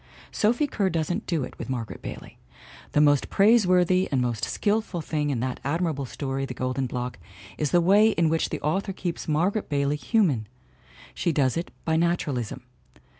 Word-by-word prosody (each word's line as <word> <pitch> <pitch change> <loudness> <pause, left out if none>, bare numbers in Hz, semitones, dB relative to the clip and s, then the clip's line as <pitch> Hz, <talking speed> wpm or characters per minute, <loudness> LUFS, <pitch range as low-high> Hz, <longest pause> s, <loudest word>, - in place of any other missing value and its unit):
Sophie 235 +8 +2
Kerr 205 -9 0
doesn't 170 +4 -2
do 165 -6 0
it - - -9
with - - -6
Margaret 120 -4 -4
Bailey; - - -9 0.5
the 150 - +4
most 145 -2 +3
praiseworthy 185 -4 +4
and 135 - +2
most 120 -3 -1
skillful 210 -4 -1
thing 150 -2 -2
in 125 -5 -1
that 130 0 -3
admirable 150 -1 -1
story 135 +1 -3
The 135 - -5
Golden 130 +1 -1
Block 125 -3 -4 0.4
is 150 - +1
the 175 - +4
way 205 +5 +5
in 170 -6 +2
which 160 +1 +1
the - - -3
author 190 +6 -1
keeps 175 -3 -4
Margaret 180 +7 0
Bailey 140 0 0
human. 150 - +1 0.7
She 165 - 0
does 140 -4 +1
it 170 +1 -3 0.2
by 160 -1 +2
naturalism. 145 -8 -1
155 Hz, 175 wpm, -26 LUFS, 135-185 Hz, 0.7 s, way